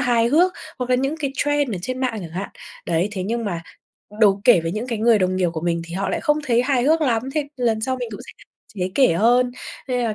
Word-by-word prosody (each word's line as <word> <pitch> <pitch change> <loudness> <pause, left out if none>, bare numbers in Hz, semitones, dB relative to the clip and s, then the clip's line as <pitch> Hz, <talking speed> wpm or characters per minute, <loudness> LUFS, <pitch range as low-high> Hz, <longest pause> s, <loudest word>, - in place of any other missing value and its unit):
hài 240 -2 +2
hước, 345 +7 +4 0.3
hoặc 250 0 -3
là 250 - +4
những 270 +4 -1
cái 285 -4 -2
trend 290 -6 0
ở - - -4
trên 255 +5 -4
mạng 250 -4 -1
chẳng 170 -3 -8
hạn. 190 +4 -4 0.4
Đấy, 170 +3 +1
thế 190 - -3
nhưng 230 +4 -2
mà 175 -5 -3 0.6
đố 200 -2 +5
kể 235 -9 +6
với 165 0 -3
những 215 +5 -3
cái 230 -3 -3
người 225 -1 +4
đồng 185 0 0
nghiệp 180 -2 +1
của 160 - -4
mình 170 0 -1
thì 170 0 -8
họ 195 +1 -2
lại - - -1
không 300 -2 +1
thấy 240 -1 +3
hài 260 -2 +1
hước 315 +5 +3
lắm, 235 -7 +1
thế 295 -2 -1
lần 230 -3 0
sau 260 +3 -1
mình 245 -2 -4
cũng 205 - -8
sẽ - - -9
hạn - - -18 0.3
chế 185 -1 -3
kể 260 -10 +4
hơn. 245 +6 +3 0.4
Nên 250 -1 0
là, 220 - -1
235 Hz, 270 wpm, -21 LUFS, 190-255 Hz, 0.6 s, kể